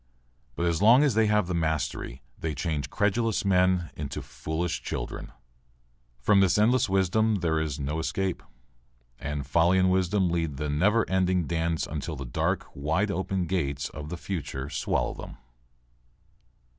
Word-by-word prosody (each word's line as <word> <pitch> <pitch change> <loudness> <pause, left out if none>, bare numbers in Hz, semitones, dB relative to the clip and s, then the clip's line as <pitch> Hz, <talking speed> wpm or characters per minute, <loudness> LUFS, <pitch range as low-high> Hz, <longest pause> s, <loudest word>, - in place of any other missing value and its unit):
But 85 - -1
as 85 0 +1
long 120 +7 +7
as 140 -5 +3
they 110 0 +3
have 105 -2 +3
the 90 - -3
mastery 80 -5 -2
they 80 +1 -4
change 75 -1 -2
credulous 105 +1 0
men 90 -2 +2
into 75 -2 -5
foolish 80 +2 -3
children. - - -5 0.9
From 100 +11 +4
this 95 -1 +4
endless 115 +2 +3
round 95 +2 +2
there 80 -2 +2
is 75 -2 -2
no 75 +3 -2
escape. 95 +3 -2 0.8
And 75 -1 -4
folly 85 +5 +3
and 95 0 +4
wisdom 95 0 +2
lead 80 -5 -1
the 75 0 -2
never 105 +9 +3
ending 95 -2 +1
dance 80 0 -1
until 75 +2 -4
the 70 -1 -6
dark, - - -1
wide 80 +9 0
open 95 -1 -1
gates 70 -6 -1
of 75 -1 -8
the 90 - -4
future 70 -7 -5
swallow - - 0
them. - - -9
85 Hz, 155 wpm, -27 LUFS, 75-95 Hz, 0.9 s, long